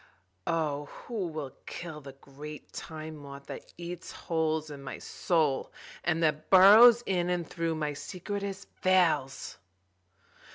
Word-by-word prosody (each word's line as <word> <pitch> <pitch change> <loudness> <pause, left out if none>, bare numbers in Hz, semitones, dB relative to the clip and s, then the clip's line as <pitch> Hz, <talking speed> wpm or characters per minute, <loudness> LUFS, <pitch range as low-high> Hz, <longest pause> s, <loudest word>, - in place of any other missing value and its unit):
(O 150 -3 0
who 205 - -5
will 155 -4 -5 0.2
kill 160 -3 -7
the 135 -1 -10
great 145 +2 -11
Time 155 -1 -7
Moth 140 -1 -10
that - - -9
eats 175 0 -7
holes 160 -2 -1
in 140 -1 -8
my 135 - -6
soul 155 -6 0 0.3
and 165 -1 +1
that 155 -1 0
burrows 220 +6 +9
in 180 -2 0
and 175 -2 -1
through 165 -1 -2
my 150 -1 -2
secretest 200 +5 -5
veils!) 180 -8 +2
160 Hz, 130 wpm, -30 LUFS, 150-180 Hz, 0.3 s, burrows